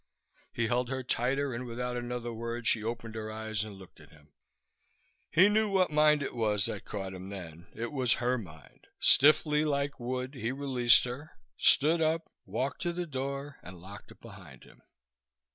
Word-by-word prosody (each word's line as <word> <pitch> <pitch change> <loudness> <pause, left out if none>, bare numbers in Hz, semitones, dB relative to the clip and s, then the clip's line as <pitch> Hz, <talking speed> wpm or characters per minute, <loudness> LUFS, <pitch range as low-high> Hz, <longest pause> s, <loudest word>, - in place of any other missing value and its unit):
He 120 - -1
held 120 +2 0
her 130 0 -3
tighter 130 +3 0
and 125 +2 -5
without 125 +1 -4
another 120 -1 -4
word 115 +1 -5
she 110 -2 +2
opened 115 0 -5
her 110 -1 -5
eyes 110 -1 -3
and 105 -2 -8
looked 95 -2 -15
at - - -16
him. 75 -1 -21 1.0
He 185 +5 +6
knew 215 +1 +2
what 190 -4 +2
mind 150 -1 +4
it - - -5
was 105 -3 +1
that 105 - -4
caught 95 -2 -5
him 95 +1 -8
then. 85 -4 -9
It 115 +1 -4
was 130 -5 +2
her 125 +1 0
mind. 80 -8 -14
Stiffly, 150 +1 +5
like 145 -2 -1
wood, 125 +2 -4
he 125 -3 -3
released 130 -3 +4
her, 125 +5 -6 0.3
stood 160 - +5
up, 160 +1 0 0.2
walked 125 +8 -3
to 175 0 -1
the 175 0 -3
door 140 -1 -5
and 90 0 -11
locked 95 +4 -12
it - - -16
behind 95 - -13
him. - - -19
120 Hz, 180 wpm, -30 LUFS, 110-140 Hz, 1.0 s, He